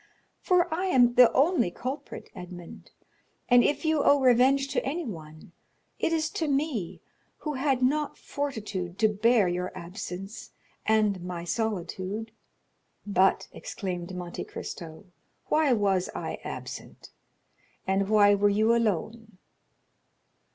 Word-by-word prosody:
—for 360 Hz, -1 st, +3 dB
I 365 Hz, +4 st, -1 dB
am 245 Hz, -8 st, +4 dB
the 245 Hz, -1 st, +7 dB
only 280 Hz, -, +3 dB
culprit, 265 Hz, -, -6 dB
Edmond, 180 Hz, -2 st, -10 dB, 0.6 s
and 245 Hz, -1 st, +6 dB
if 295 Hz, -, 0 dB
you 315 Hz, -2 st, +2 dB
owe 285 Hz, -, +5 dB
revenge 265 Hz, +2 st, +4 dB
to -, -, -1 dB
anyone, 175 Hz, -, -6 dB, 0.5 s
it -, -, +1 dB
is 320 Hz, -1 st, 0 dB
to 320 Hz, -, -2 dB
me, 275 Hz, -, -1 dB, 0.4 s
who 300 Hz, -, -4 dB
had 265 Hz, -1 st, 0 dB
not 295 Hz, +3 st, +1 dB
fortitude 210 Hz, -11 st, -4 dB
to 220 Hz, -, +4 dB
bear 215 Hz, 0 st, +3 dB
your 180 Hz, +1 st, -2 dB
absence 195 Hz, +2 st, -7 dB, 0.3 s
and 215 Hz, -4 st, +2 dB
my 175 Hz, -1 st, -5 dB
solitude." 205 Hz, +1 st, -3 dB, 0.7 s
"But," 190 Hz, -2 st, +2 dB
exclaimed 180 Hz, -2 st, -5 dB
Monte 175 Hz, -1 st, -5 dB
Cristo, 165 Hz, +3 st, -8 dB, 0.4 s
"why 305 Hz, -2 st, +3 dB
was 195 Hz, -4 st, +1 dB
I -, -, -4 dB
absent? -, -, -8 dB, 0.7 s
And 195 Hz, +1 st, 0 dB
why 205 Hz, -1 st, +6 dB
were 205 Hz, 0 st, +3 dB
you 215 Hz, +3 st, +3 dB
alone?" 220 Hz, -1 st, -1 dB
220 Hz, 125 wpm, -27 LUFS, 185-270 Hz, 0.7 s, the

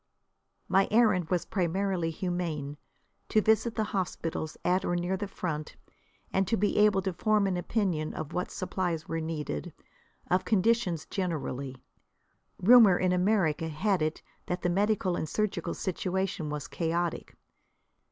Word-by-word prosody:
My 195 Hz, +1 st, +3 dB
errand 210 Hz, -7 st, +3 dB
was 180 Hz, -2 st, 0 dB
primarily 185 Hz, -1 st, 0 dB
humane, 165 Hz, -5 st, -3 dB, 0.5 s
to 215 Hz, -, +4 dB
visit 220 Hz, +2 st, +2 dB
the 220 Hz, -, +1 dB
hospitals 165 Hz, -4 st, -3 dB
at 185 Hz, +1 st, +2 dB
or 175 Hz, -, 0 dB
near 175 Hz, +2 st, 0 dB
the 200 Hz, +2 st, -4 dB
front, 155 Hz, -6 st, -4 dB, 0.6 s
and 190 Hz, -1 st, +2 dB
to 225 Hz, -, +1 dB
be 205 Hz, +2 st, +1 dB
able 210 Hz, -2 st, +4 dB
to 190 Hz, -1 st, -1 dB
form 210 Hz, +3 st, +2 dB
an 190 Hz, -2 st, 0 dB
opinion 175 Hz, -4 st, -1 dB
of 155 Hz, 0 st, -5 dB
what 180 Hz, -, -2 dB
supplies 180 Hz, -3 st, -3 dB
were 165 Hz, -, -2 dB
needed, 150 Hz, -, -4 dB, 0.6 s
of 185 Hz, +1 st, +3 dB
conditions 200 Hz, -4 st, +1 dB
generally. 140 Hz, -8 st, -4 dB, 0.8 s
Rumour 220 Hz, -3 st, +7 dB
in 185 Hz, -1 st, +1 dB
America 180 Hz, -4 st, +2 dB
had 180 Hz, +4 st, 0 dB
it 155 Hz, +1 st, -1 dB, 0.2 s
that 180 Hz, +1 st, -3 dB
the 175 Hz, -, +2 dB
medical 195 Hz, -1 st, +1 dB
and 155 Hz, -, -3 dB
surgical 215 Hz, +3 st, -1 dB
situation 190 Hz, -2 st, -2 dB
was 150 Hz, -1 st, -4 dB
chaotic. 170 Hz, 0 st, -2 dB
180 Hz, 140 wpm, -29 LUFS, 165-195 Hz, 0.8 s, Rumour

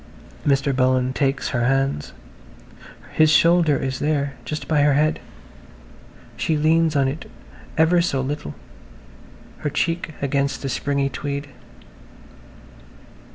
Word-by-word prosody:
Mr. 140 Hz, -1 st, +1 dB
Bullen 130 Hz, 0 st, +2 dB
takes 135 Hz, 0 st, 0 dB
her 120 Hz, -2 st, 0 dB
hands. 135 Hz, -, 0 dB, 1.0 s
His 155 Hz, -1 st, +4 dB
shoulder 165 Hz, -1 st, +4 dB
is 130 Hz, 0 st, -3 dB
there–just 140 Hz, -2 st, -2 dB
by 150 Hz, -2 st, +2 dB
her 145 Hz, -1 st, +4 dB
head. 155 Hz, +2 st, +2 dB, 1.2 s
She 160 Hz, -, 0 dB
leans 160 Hz, +1 st, +2 dB
on 135 Hz, -2 st, +3 dB
it 145 Hz, +4 st, -5 dB, 0.5 s
ever 165 Hz, +2 st, +4 dB
so 155 Hz, -6 st, 0 dB
little, 135 Hz, -, -4 dB, 1.0 s
her 150 Hz, -, -2 dB
cheek 165 Hz, +1 st, -2 dB
against 140 Hz, 0 st, -1 dB
the 135 Hz, -, -2 dB
springy 140 Hz, +2 st, -1 dB
tweed. 140 Hz, 0 st, -5 dB
140 Hz, 110 wpm, -22 LUFS, 135-155 Hz, 1.2 s, His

